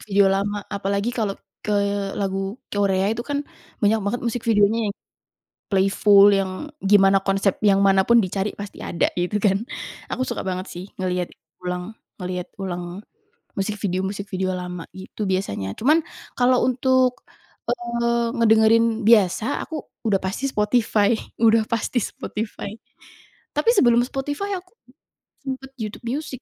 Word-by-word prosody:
video 195 -1 +4
lama, 200 +1 -1
apalagi 200 +3 -1
kalau 215 -5 -2 0.2
ke 210 -1 0 0.4
lagu 195 +1 -2 0.2
Korea 200 0 +2
itu 225 - -4
kan 285 +3 -3 0.4
banyak 220 +2 +3
banget 205 +4 -2
musik 235 +1 -1
videonya, 215 0 +3
yang 200 - -4 0.7
playful 200 +1 +5
yang 195 +8 -1
gimana 195 -1 +5
konsep 195 0 +1
yang 200 -2 +4
manapun 195 +4 +5
dicari 195 +2 -2
pasti 200 -1 -8
ada, 170 - 0
gitu 185 +4 -1
kan. 205 +2 +2 0.4
Aku - - -3
suka 255 - -3
banget 185 0 -3
sih 175 +1 -7
ngelihat 180 -1 -2 0.3
ulang 180 +4 -5 0.2
ngelihat 180 0 -4
ulang 180 +1 -5 0.5
music 205 +2 -2
video 185 -3 -1
music 195 +1 -4
video 185 -1 -2
lama, 180 -1 -6
gitu 190 +2 -6
biasanya. 100 - -2
Cuman 305 +7 +4 0.3
kalau 250 0 +3
untuk, 255 0 +2 0.5
eee, 235 -1 0
ngedengerin 225 0 +4
biasa, 215 +3 +3
aku 310 -4 -6 0.2
udah 210 -3 +3
pasti 205 +9 -2
Spotify 210 -2 +2 0.2
udah 225 0 +5
pasti 230 +2 0
Spotify. 210 0 -5 0.8
Tapi 460 - +1
sebelum 240 -9 +5
Spotify 290 +10 -3
aku 365 0 -13 0.7
sempet 265 0 -5
YouTube 220 +2 -6
Music. 295 +5 -3
205 Hz, 135 wpm, -23 LUFS, 195-235 Hz, 0.8 s, playful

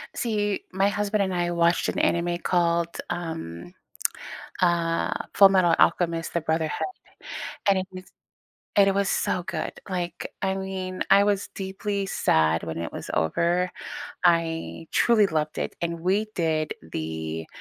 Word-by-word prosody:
See, 205 -4 -1
my 195 +2 +2
husband 205 0 0
and 190 -1 -2
I 175 -1 0
watched 170 0 +2
an - - -3
anime 175 0 +1
called, 170 -1 +1
um, 90 - -5 0.9
uh, 170 -2 +2 0.2
Fullmetal 190 -4 +6
Alchemist: 165 -1 +2
The 170 - +2
Brotherhood, 160 0 -1 0.9
and 195 - +5
it 185 - -4
was 185 0 -9 0.7
and 200 -1 +6
it 195 - +3
was 200 -1 +2
so 180 - 0
good, 170 -4 -3 0.2
like, 175 -2 -3
I 190 0 +1
mean, 190 -1 -4
I 200 +1 +7
was 205 -1 0
deeply 195 +1 -3
sad 80 - +2
when 80 0 -4
it 85 0 -4
was - - -7
over. 170 - +1 0.6
I 165 - +1
truly 215 -4 +4
loved 155 -2 -1
it, - - -3
and 170 -1 -2
we 195 +5 +2
did 160 -2 0 0.2
the, 80 0 -4
175 Hz, 145 wpm, -26 LUFS, 165-190 Hz, 0.9 s, I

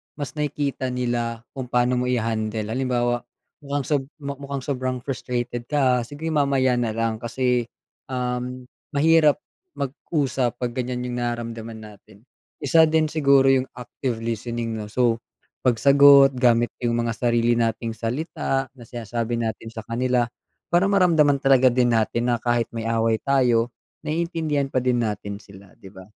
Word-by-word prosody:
mas 145 -3 -5
nakikita 145 -3 -2
nila 120 -2 -2
kung 130 -2 -6
paano 125 0 +2
mo 125 - -1
i-handle. 110 -2 -1
Halimbawa, 120 -1 0 0.4
"Mukhang 145 -1 -3
sob 145 -3 0
mukhang 140 0 -5
sobrang 130 -2 -2
frustrated 120 -3 -3
ka 130 -4 +2
sige, 150 +4 -5
mamaya 135 -4 +2
na 115 -2 -1
lang 115 -1 -1
kasi, 125 0 0 0.4
um, 125 0 -3 0.3
mahirap 155 0 +5 0.4
mag-usap 135 -3 -1
'pag 125 -1 -1
ganyan 125 0 -2
yung 125 0 -4
nararamdaman 115 -2 -4
natin." 105 0 -15 0.4
Isa 160 +3 +5
din 155 0 +2
siguro 140 -3 +4
yung 130 0 +2
active 125 -1 -4
listening 115 0 -3
'no. 105 - -5
So, 115 0 +1 0.5
pagsagot 140 +3 +7
gamit 120 -1 +3
yung 120 -1 0
mga 115 0 -1
sarili 120 -1 +2
nating 115 0 -1
salita 135 - -2
na 120 - -11
sinasabi 120 0 -3
natin 115 0 -4
sa 110 - -7
kanila 125 +1 +1 0.5
para 175 - +5
maramdaman 165 -8 +4
talaga 130 -1 +5
din 120 -1 +2
natin 115 +2 0
na - - +3
kahit 120 -1 +1
may 115 - -3
away 115 0 +2
tayo, 125 -4 +2 0.3
naiintindihan 160 -3 -1
pa 130 - 0
din 125 -1 +1
natin 105 -2 -3
sila, 100 -1 -15
'di 95 -4 -13
ba. 95 - -11
125 Hz, 145 wpm, -23 LUFS, 115-140 Hz, 0.5 s, pagsagot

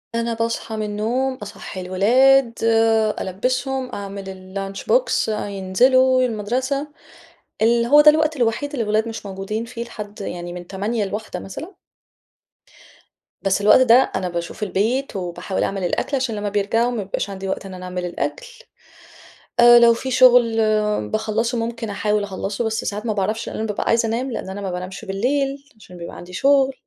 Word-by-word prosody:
أنا 230 0 -1
باصحى 230 0 -3
من 215 - -2
النوم، 230 +6 -1
أصحّي 205 -4 -8
الولاد، 235 +7 +4 0.7
ألبِّسهم، 255 +7 -2
أعمل 200 0 -6
الlunch 195 +1 -6
box - - +2
أ 210 -1 -2
ينزلوا 255 +7 +3
المدرسة. 255 +5 -1 0.7
اللي 235 +1 +3
هو 295 +4 +7
ده 300 0 +8
الوقت 310 0 +1
الوحيد 240 +4 0
اللي 270 -6 -2
الأولاد 215 +1 0
مش 225 -2 -7
موجودين 200 +3 -4
فيه 235 0 -6
لحد، 210 -3 -9
يعني 175 -2 -5
من 175 -1 -8
08:00 205 +3 -2
ل13:00 205 -2 -5
مثلًا. 325 - -9 1.6
بس 195 0 +1
الوقت 210 +5 +6
ده، 250 +1 +5
أنا 185 -1 -1
باشوف 170 +4 -5
البيت 220 +6 -1
وباحاول 180 +1 -3
أعمل 195 -1 -2
الأكل 180 +10 -1
عشان 255 -4 -2
لما 205 0 -2
بيرجعوا 210 +4 +1
ما 230 -4 -3
بيبقاش 195 +1 -3
عندي 195 0 -6
وقت 190 +1 -3
إن 190 - -8
أنا 185 0 -8
أعمل 180 0 -4
الأكل، - - -4 1.1
آآ 240 0 +9
لو 235 0 +6
في 260 +3 -5
شغل 250 -3 +5 0.5
باخلَّصه، 220 +2 -1
ممكن 230 -1 -4
أحاول 210 +1 0
أخلَّصه، 200 +2 -3
بس 220 0 -2
ساعات 210 +2 -3
ما 220 - 0
باعرفش 205 +2 -2
لأن - - -6
أنا 220 - -2
بابقى 210 - -2
عايزة 230 0 +2
أنام 250 +4 -2
لأن 220 - -5
أنا 195 +1 -6
ما 195 -2 -3
بانامش 185 +4 -6
بالليل، 270 +8 -1 0.2
عشان 180 -4 -14
بيبقى 170 0 -8
عندي 180 +1 -11
شغل، 270 +5 +3
220 Hz, 170 wpm, -21 LUFS, 195-250 Hz, 1.6 s, آآ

